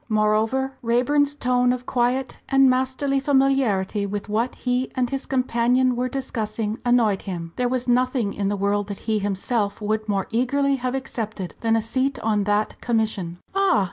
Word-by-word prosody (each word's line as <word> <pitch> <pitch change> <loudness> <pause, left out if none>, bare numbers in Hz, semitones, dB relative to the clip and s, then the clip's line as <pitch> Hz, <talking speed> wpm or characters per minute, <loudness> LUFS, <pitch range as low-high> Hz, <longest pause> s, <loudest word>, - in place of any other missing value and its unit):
Moreover 220 +5 +1
Raeburn's 280 +5 +2
tone 250 -2 +2
of 250 0 -3
quiet 250 +1 0
and 270 0 +5
masterly 260 +2 +1
familiarity 265 -8 +1
with 205 +1 -5
what 225 +4 0
he 250 0 -1
and 255 -1 +1
his 275 0 -3
companion 250 0 +2
were 250 +1 -1
discussing 225 -4 -3
annoyed 235 -5 +3
him. 170 -4 -6
There 250 -1 0
was 255 0 -1
nothing 250 -4 +1
in 200 -1 -2
the 205 - -1
world 200 +1 0
that 200 -1 -5
he 220 -1 +1
himself 200 +1 -1
would 215 0 -2
more 195 -2 0
eagerly 275 +4 +1
have 255 0 -2
accepted 220 -8 -4
than 225 -1 +2
a 225 - +1
seat 260 +4 -1
on 210 -2 +1
that 205 +1 0
Commission. 220 -7 -1 0.2
"Ah! 390 - +3
240 Hz, 170 wpm, -23 LUFS, 210-260 Hz, 0.2 s, and